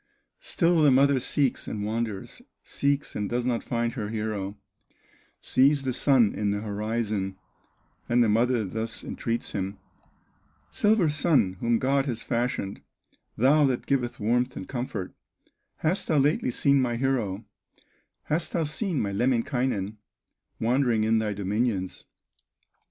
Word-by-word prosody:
Still 170 Hz, -1 st, +2 dB
the 150 Hz, -, +6 dB
mother 135 Hz, +1 st, +4 dB
seeks, 135 Hz, +1 st, 0 dB
and 105 Hz, -1 st, -3 dB
wanders, 110 Hz, -2 st, -4 dB, 0.2 s
Seeks, 140 Hz, 0 st, -1 dB
and 105 Hz, -1 st, -2 dB
does 120 Hz, 0 st, -1 dB
not 120 Hz, -2 st, 0 dB
find 120 Hz, -1 st, -1 dB
her 105 Hz, -3 st, -4 dB
hero; 105 Hz, -2 st, -3 dB, 0.8 s
Sees 135 Hz, +2 st, +3 dB
the 130 Hz, -1 st, -1 dB
Sun 125 Hz, -5 st, +3 dB
in 105 Hz, -1 st, -1 dB
the 100 Hz, 0 st, -1 dB
horizon, 105 Hz, -2 st, -2 dB, 0.7 s
And 120 Hz, 0 st, +4 dB
the -, -, +2 dB
mother 115 Hz, +1 st, +2 dB
thus 110 Hz, +4 st, -4 dB
entreats 115 Hz, 0 st, -3 dB
him: 100 Hz, 0 st, -3 dB, 0.9 s
"Silver 210 Hz, -4 st, +3 dB
Sun, 150 Hz, -, +2 dB
whom 115 Hz, 0 st, +2 dB
God 135 Hz, +3 st, +1 dB
has 120 Hz, -3 st, -3 dB
fashioned, 115 Hz, -4 st, -2 dB, 0.6 s
Thou 145 Hz, +5 st, +5 dB
that 125 Hz, -2 st, -1 dB
giveth 125 Hz, -3 st, -1 dB
warmth 125 Hz, +4 st, 0 dB
and 95 Hz, -, -6 dB
comfort, 120 Hz, -7 st, -4 dB, 0.6 s
Hast 170 Hz, +5 st, -1 dB
thou 155 Hz, -, +2 dB
lately 140 Hz, -1 st, +2 dB
seen 140 Hz, +3 st, +3 dB
my 120 Hz, -2 st, 0 dB
hero, 115 Hz, -5 st, -1 dB, 0.8 s
Hast 160 Hz, +3 st, -2 dB
thou 165 Hz, -, +1 dB
seen 160 Hz, +1 st, -2 dB
my 100 Hz, -, -1 dB
Lemminkainen, 120 Hz, -2 st, 0 dB, 0.6 s
Wandering 120 Hz, -1 st, +2 dB
in 110 Hz, +1 st, +3 dB
thy 105 Hz, -1 st, -1 dB
dominions?" 100 Hz, -1 st, -2 dB
120 Hz, 135 wpm, -26 LUFS, 105-135 Hz, 0.9 s, the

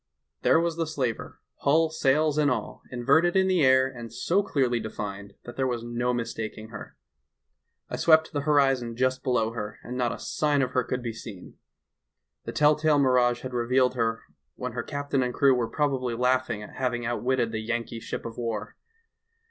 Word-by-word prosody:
"There -, -, +4 dB
was 170 Hz, -1 st, -1 dB
the 165 Hz, -1 st, -1 dB
slaver, 130 Hz, -7 st, -3 dB, 0.2 s
hull, 160 Hz, +3 st, +2 dB
sails 150 Hz, 0 st, +2 dB
and 145 Hz, -1 st, +3 dB
all, 120 Hz, -5 st, -3 dB
inverted 140 Hz, +9 st, +3 dB
in 190 Hz, 0 st, +4 dB
the 185 Hz, -4 st, +3 dB
air, 130 Hz, 0 st, +5 dB
and 120 Hz, -4 st, -9 dB
so 170 Hz, -, +1 dB
clearly 130 Hz, -10 st, 0 dB
defined 100 Hz, -2 st, -6 dB
that 120 Hz, -, -10 dB
there 130 Hz, -1 st, +1 dB
was 120 Hz, -2 st, -2 dB
no 120 Hz, +1 st, -1 dB
mistaking 110 Hz, -2 st, -4 dB
her. 105 Hz, -2 st, -10 dB, 0.9 s
I -, -, -5 dB
swept 160 Hz, -1 st, +4 dB
the 145 Hz, -, -1 dB
horizon 135 Hz, -5 st, +2 dB
just 130 Hz, +1 st, 0 dB
below 120 Hz, -4 st, +1 dB
her 110 Hz, -2 st, -6 dB
and 125 Hz, -, -6 dB
not 125 Hz, -2 st, 0 dB
a -, -, -5 dB
sign 145 Hz, -2 st, 0 dB
of 130 Hz, -, -2 dB
her 125 Hz, 0 st, +1 dB
could 125 Hz, +1 st, -3 dB
be 115 Hz, -2 st, -3 dB
seen. 100 Hz, -4 st, -10 dB, 0.9 s
The -, -, -4 dB
tell 150 Hz, 0 st, +4 dB
tale 155 Hz, -1 st, +2 dB
mirage 125 Hz, -3 st, +3 dB
had 130 Hz, -1 st, -6 dB
revealed 125 Hz, +1 st, +2 dB
her 115 Hz, -2 st, -1 dB, 0.3 s
when 125 Hz, 0 st, -4 dB
her 120 Hz, 0 st, -3 dB
captain 145 Hz, +1 st, -2 dB
and 125 Hz, -1 st, -2 dB
crew 140 Hz, -1 st, +5 dB
were 120 Hz, -3 st, 0 dB
probably 130 Hz, -5 st, -1 dB
laughing 125 Hz, -3 st, 0 dB
at -, -, -12 dB
hav 125 Hz, -2 st, 0 dB
ing 120 Hz, 0 st, -4 dB
outwitted 120 Hz, 0 st, 0 dB
the 110 Hz, -1 st, -3 dB
Yankee 115 Hz, +1 st, -3 dB
ship -, -, -6 dB
of 115 Hz, +1 st, -7 dB
war. 115 Hz, -2 st, -4 dB
125 Hz, 190 wpm, -26 LUFS, 115-140 Hz, 0.9 s, air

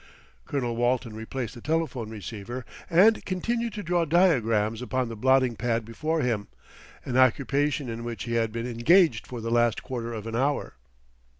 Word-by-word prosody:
Colonel 120 Hz, -4 st, -2 dB
Walton 120 Hz, -1 st, 0 dB
replaced 115 Hz, +2 st, -5 dB
the 120 Hz, -, -11 dB
telephone 155 Hz, -7 st, -1 dB
receiver 110 Hz, +4 st, -7 dB, 0.2 s
and 195 Hz, +6 st, +5 dB
continued 230 Hz, +5 st, -2 dB
to 210 Hz, -, -5 dB
draw 175 Hz, 0 st, +1 dB
diagrams 120 Hz, -, +2 dB
upon 125 Hz, -1 st, -1 dB
the 115 Hz, -, -6 dB
blotting 130 Hz, +1 st, +3 dB
pad 115 Hz, -1 st, -1 dB
before 155 Hz, +8 st, -2 dB
him, 115 Hz, -5 st, -1 dB, 0.6 s
an 125 Hz, -, -1 dB
occupation 140 Hz, +2 st, +2 dB
in 115 Hz, 0 st, -5 dB
which 115 Hz, -4 st, -5 dB
he 115 Hz, -, -4 dB
had 115 Hz, -1 st, +1 dB
been 115 Hz, +1 st, -4 dB
engaged 125 Hz, +3 st, +3 dB
for 120 Hz, -2 st, -6 dB
the 115 Hz, +1 st, -3 dB
last 120 Hz, -1 st, +2 dB
quarter 120 Hz, -2 st, -4 dB
of 110 Hz, -2 st, -6 dB
an 115 Hz, 0 st, -4 dB
hour. 140 Hz, +4 st, 0 dB
120 Hz, 170 wpm, -26 LUFS, 115-145 Hz, 0.6 s, and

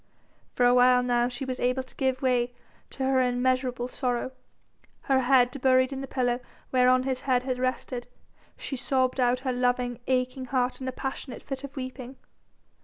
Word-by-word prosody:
For 245 Hz, -, +3 dB
a 245 Hz, -, +6 dB
while 250 Hz, 0 st, +5 dB
now 240 Hz, -1 st, +2 dB
she 245 Hz, +2 st, -5 dB
was 255 Hz, -1 st, -4 dB
able 250 Hz, +1 st, 0 dB
to 255 Hz, -, -13 dB
give 260 Hz, 0 st, -1 dB
way 245 Hz, -1 st, +1 dB, 0.4 s
to 270 Hz, -, -5 dB
her 265 Hz, 0 st, +3 dB
immeasurable 250 Hz, 0 st, 0 dB
sorrow. 250 Hz, 0 st, -2 dB, 0.7 s
Her 270 Hz, -1 st, +2 dB
head 250 Hz, -1 st, +3 dB
buried 260 Hz, 0 st, +3 dB
in 270 Hz, -, -5 dB
the 270 Hz, -, -5 dB
pillow 245 Hz, -2 st, 0 dB, 0.3 s
whereon 255 Hz, 0 st, +4 dB
his 260 Hz, -1 st, -2 dB
head 250 Hz, -2 st, +1 dB
had 255 Hz, -1 st, -2 dB
rested, 255 Hz, -1 st, -2 dB, 0.5 s
she 275 Hz, -, -4 dB
sobbed 260 Hz, 0 st, 0 dB
out 250 Hz, 0 st, +2 dB
her 260 Hz, -1 st, -1 dB
loving, 245 Hz, -1 st, 0 dB
aching 255 Hz, 0 st, 0 dB
heart 255 Hz, 0 st, -1 dB
in 260 Hz, -, -4 dB
a -, -, -1 dB
passionate 265 Hz, 0 st, -6 dB
fit 270 Hz, -1 st, -5 dB
of 280 Hz, 0 st, -8 dB
weeping. 255 Hz, -1 st, -6 dB
255 Hz, 180 wpm, -27 LUFS, 245-260 Hz, 0.7 s, a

